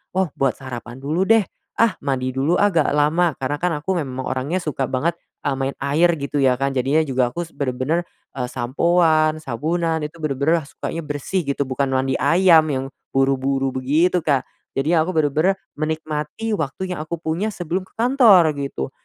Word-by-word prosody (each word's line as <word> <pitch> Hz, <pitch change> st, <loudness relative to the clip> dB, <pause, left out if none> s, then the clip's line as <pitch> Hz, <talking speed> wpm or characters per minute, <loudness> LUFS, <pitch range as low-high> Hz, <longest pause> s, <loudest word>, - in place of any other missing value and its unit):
oh 190 Hz, -5 st, +1 dB
buat 135 Hz, -2 st, +2 dB
sarapan 125 Hz, -2 st, -8 dB
dulu 165 Hz, +7 st, 0 dB
deh. 225 Hz, -2 st, +5 dB, 0.4 s
Ah, 225 Hz, -4 st, +4 dB
mandi 130 Hz, -2 st, -1 dB
dulu 145 Hz, +7 st, +1 dB
agak 185 Hz, -7 st, +3 dB
lama, 155 Hz, +2 st, +2 dB
karena 135 Hz, +2 st, -1 dB
kan 180 Hz, 0 st, 0 dB
aku 190 Hz, +2 st, 0 dB
memang 130 Hz, -1 st, -5 dB
orangnya 135 Hz, +8 st, -1 dB
suka 150 Hz, -5 st, -3 dB
banget, 150 Hz, +7 st, 0 dB, 0.3 s
eee, 135 Hz, -, +1 dB
main 135 Hz, +1 st, -1 dB
air 155 Hz, +5 st, +3 dB
gitu 140 Hz, +1 st, -5 dB
ya 130 Hz, -2 st, +3 dB
kan 135 Hz, 0 st, -1 dB
jadinya 135 Hz, +5 st, +2 dB
juga 125 Hz, -2 st, +1 dB
aku 170 Hz, +4 st, -4 dB
s -, -, -23 dB
bener-bener, 140 Hz, +5 st, -1 dB, 0.3 s
eee, 125 Hz, -2 st, -2 dB
sampoan, 155 Hz, +3 st, +2 dB
sabunan, 160 Hz, +4 st, -1 dB
itu 155 Hz, +3 st, -7 dB
bener-bener 155 Hz, +3 st, +1 dB
sukanya 165 Hz, -, -5 dB
bersih 150 Hz, +3 st, -3 dB
gitu, 140 Hz, 0 st, 0 dB
bukan 135 Hz, +1 st, -1 dB
mandi 130 Hz, 0 st, 0 dB
ayam 170 Hz, -3 st, +5 dB
yang 135 Hz, -2 st, -1 dB, 0.3 s
buru-buru 135 Hz, 0 st, +1 dB
begitu, 155 Hz, +8 st, +2 dB
Kak. 140 Hz, -4 st, +1 dB, 0.3 s
Jadi 135 Hz, +4 st, 0 dB
aku 165 Hz, +2 st, +2 dB
bener-bener 155 Hz, +5 st, +2 dB, 0.2 s
menikmati 155 Hz, +6 st, -3 dB
waktu 185 Hz, +2 st, -3 dB
yang 170 Hz, -, -6 dB
aku 160 Hz, +2 st, -4 dB
punya 165 Hz, +6 st, -2 dB
sebelum 180 Hz, -1 st, -3 dB
ke -, -, -31 dB
kantor 225 Hz, -, +5 dB
gitu. 105 Hz, -, -4 dB
150 Hz, 175 wpm, -21 LUFS, 135-170 Hz, 0.4 s, deh